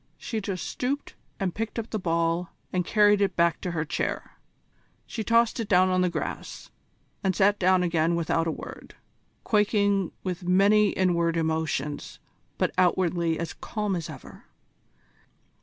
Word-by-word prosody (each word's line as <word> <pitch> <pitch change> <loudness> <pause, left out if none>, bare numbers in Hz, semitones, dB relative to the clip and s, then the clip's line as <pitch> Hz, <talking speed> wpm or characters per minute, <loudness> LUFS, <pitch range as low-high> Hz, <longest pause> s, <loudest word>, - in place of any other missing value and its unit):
She 225 -2 -4
just 190 -3 -4
stooped 275 +3 -3 0.3
and 190 -3 -1
picked 225 +2 -4
up 230 0 -4
the 215 - -1
ball 170 0 0 0.2
and 180 -1 +1
carried 205 +2 +4
it 195 -3 +1
back 170 -1 +2
to 180 - -3
her 160 -2 -2
chair. 150 - -3 0.7
She 220 - -5
tossed 230 +1 +3
it 225 - -2
down 185 -1 +5
on 185 0 +2
the 180 - +2
grass, 170 - -5 0.5
and 190 -2 +1
sat 205 +2 +3
down 185 0 +4
again 170 -1 +1
without 165 0 0
a - - +1
word, - - -9 0.5
quaking 205 -3 +2
with 185 -1 -3
many 200 +4 +4
inward 170 -3 +1
emotions, 160 -3 -2 0.4
but - - 0
outwardly 175 -2 +2
as 170 0 -4
calm 210 -3 -3
as 165 -3 -4
ever. - - -11
185 Hz, 155 wpm, -26 LUFS, 170-205 Hz, 0.7 s, down